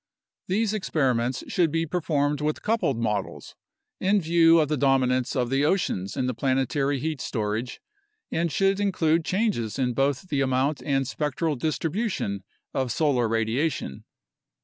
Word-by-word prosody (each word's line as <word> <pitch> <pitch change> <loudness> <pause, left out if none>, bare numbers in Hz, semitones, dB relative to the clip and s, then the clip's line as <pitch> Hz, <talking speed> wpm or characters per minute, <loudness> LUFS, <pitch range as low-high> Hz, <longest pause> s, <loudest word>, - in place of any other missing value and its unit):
These 215 +3 +1
experiments 130 - 0
should 175 -3 +2
be 165 +1 0
performed 150 -3 0
with 150 0 -2
coupled 215 - +1
models, 105 -4 -3 0.5
in 200 +2 +3
view 165 -1 +5
of 155 - +2
the 150 - 0
dominance 130 -2 +2
of 125 -2 0
the 135 +1 +2
oceans 145 - 0
in 130 - 0
the 125 - -1
planetary 135 +3 0
heat 155 0 -3
storage, 110 +3 -3 0.5
and 165 0 0
should 195 +6 +2
include 170 -5 +2
changes 185 - -1
in 125 -2 0
both 140 +6 0
the 140 -2 0
amount 135 +2 +1
and 135 -2 0
spectral 150 +2 -1
distribution 155 - -2 0.3
of 130 -2 -1
solar 130 -4 +2
radiation. 115 - -1
145 Hz, 145 wpm, -25 LUFS, 125-165 Hz, 0.5 s, view